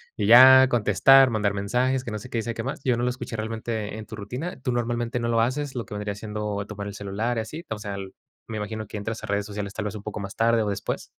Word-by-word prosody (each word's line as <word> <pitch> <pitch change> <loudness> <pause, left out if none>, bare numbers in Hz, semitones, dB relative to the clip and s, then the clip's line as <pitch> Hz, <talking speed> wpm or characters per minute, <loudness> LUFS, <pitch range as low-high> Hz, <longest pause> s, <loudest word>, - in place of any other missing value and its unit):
Y 105 - -1
ya 130 +3 +9
contestar, 125 +4 +5
mandar 105 -2 0
mensajes, 125 +6 0
que 120 - -6
no 105 - -4
sé 125 - -11
qué 120 - -3
y 115 - -1
sé 115 0 -3
que 115 - -4
más. 135 +3 -5
Yo 125 -2 +2
no 120 - -1
lo 125 - +2
escuché 125 -2 -5
realmente 110 -1 -4
en 110 - -7
tu - - -9
rutina. 125 - -6
¿Tú 130 -2 -1
normalmente 120 0 -1
no 115 - -2
lo 115 -1 +2
haces? 130 +4 -1
Lo 120 -2 -4
que - - -7
vendría 105 0 -3
siendo 105 0 -4
tomar 100 -1 -6
el 100 - -6
celular 105 +4 -3
y - - +1
así, 130 +10 -6
o 110 - -3
sea, 100 -1 -5
el 95 -1 -7 0.3
me 110 - -6
imagino 110 +1 -4
que 105 - -7
entras 110 +2 -5
a - - -5
redes 100 0 -1
sociales 100 -1 -5
tal 110 0 -4
vez 105 - -4
un 105 - -8
poco 105 0 -5
más 100 -1 -6
tarde 115 0 +3
o 105 - -1
después. 100 - -3
110 Hz, 285 wpm, -25 LUFS, 105-120 Hz, 0.3 s, ya